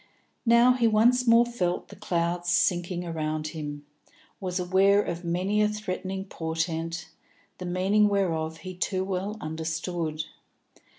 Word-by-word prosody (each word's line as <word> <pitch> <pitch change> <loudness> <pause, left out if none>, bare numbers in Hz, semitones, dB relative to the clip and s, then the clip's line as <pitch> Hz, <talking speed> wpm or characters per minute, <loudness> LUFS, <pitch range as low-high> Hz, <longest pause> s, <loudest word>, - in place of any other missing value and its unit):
Now 235 +2 +6
he 240 -2 +2
once 240 +3 +4
more 230 +1 +7
felt 180 -7 -2
the - - -11
clouds 175 0 -1
sinking 175 0 +1
about 155 -2 -2
him, 145 -2 -6 0.5
was 185 -1 -2
aware 190 +3 +4
of 170 +1 -4
many 185 +5 0
a 210 - +4
threatening 195 -2 -4
portent, 165 -1 -3 0.5
the 180 - -5
meaning 195 +4 +3
whereof 165 -5 0
he 185 - -5
too 185 +1 -1
well 195 +3 -3
understood. 160 0 -3
180 Hz, 130 wpm, -27 LUFS, 165-200 Hz, 0.5 s, more